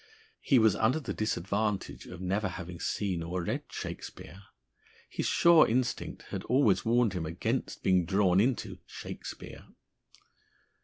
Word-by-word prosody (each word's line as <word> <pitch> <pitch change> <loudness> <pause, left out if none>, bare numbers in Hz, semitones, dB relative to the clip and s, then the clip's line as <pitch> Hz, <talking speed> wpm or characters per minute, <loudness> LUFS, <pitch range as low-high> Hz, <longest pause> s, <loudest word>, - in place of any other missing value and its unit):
He 135 - +3
was 110 -4 +5
under 120 +7 +2
the 145 - -4
disadvantage 105 0 -2
of - - -9
never 95 +2 0
having 85 -1 -7
seen 95 -5 -1
or 85 +2 -3
read - - -2
"Shakespeare." 95 - -7 0.7
His - - -3
sure 170 -2 +6
instinct 125 +2 -1
had - - -3
always 115 -7 +3
warned 115 -2 +3
him 85 -4 -3
against 85 +2 -2
being 90 -2 +3
drawn 95 0 +3
into 120 +4 0
"Shakespeare." - - -8
100 Hz, 135 wpm, -30 LUFS, 90-115 Hz, 0.7 s, sure